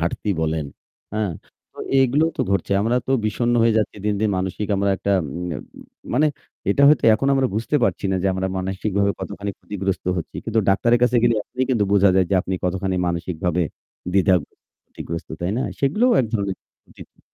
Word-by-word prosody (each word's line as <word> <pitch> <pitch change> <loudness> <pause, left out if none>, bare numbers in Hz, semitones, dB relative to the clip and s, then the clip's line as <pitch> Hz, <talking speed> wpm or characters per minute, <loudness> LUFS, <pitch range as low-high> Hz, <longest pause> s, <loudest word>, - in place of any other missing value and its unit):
ঘাটতি 85 +5 -2
বলেন। 80 -2 -1 0.5
হ্যাঁ। 105 -5 -1 0.4
তো - - -20 0.2
এগুলো 135 +4 +3
তো - - -1
ঘটছে। 100 0 0
আমরা 115 +4 +1
তো - - -4 0.2
বিষণ্ণ 120 +3 0
হয়ে 115 -1 +3
যাচ্ছি 105 - -2
দিন, 105 0 +1
দিন 110 -1 +2
মানসিক 95 +3 -3
আমরা 100 0 +1
একটা 100 - -1 0.2
উম 85 +6 -5 0.7
মানে 150 +5 +4 0.4
এটা 140 - +2
হয়তো 150 -1 +4
এখন 135 +6 0
আমরা 135 -1 +2
বুঝতে 115 +7 0
পারছি - - -1
না - - +1
যে 95 - +1
আমরা 95 0 -1
মানসিকভাবে 100 +2 0
কতখানি 100 0 -5
ক্ষতিগ্রস্ত 95 -2 -3
হচ্ছি। 85 - -5
কিন্তু 115 0 0
ডাক্তারের 115 +5 +3
কাছে 125 0 +3
গেলে 120 -1 +4
এখনই 125 +4 -3
কিন্তু 115 -5 +2
বোঝা 100 -1 +5
যায় 95 -1 +3
যে - - +3
আপনি 95 - -3
কতখানি 95 +1 -1
মানসিকভাবে 85 0 -1 0.5
দ্বিধাগ্রস্থ 95 -5 +2 0.4
ক্ষতিগ্রস্থ 85 0 -7
তাই 85 +1 -1
না? 130 - 0 0.2
সেগুলোও 210 - +3
এক 125 - -1
ধরনের 100 -4 -1 0.4
জি, - - -9
জি। - - -29
100 Hz, 185 wpm, -22 LUFS, 95-120 Hz, 0.7 s, বোঝা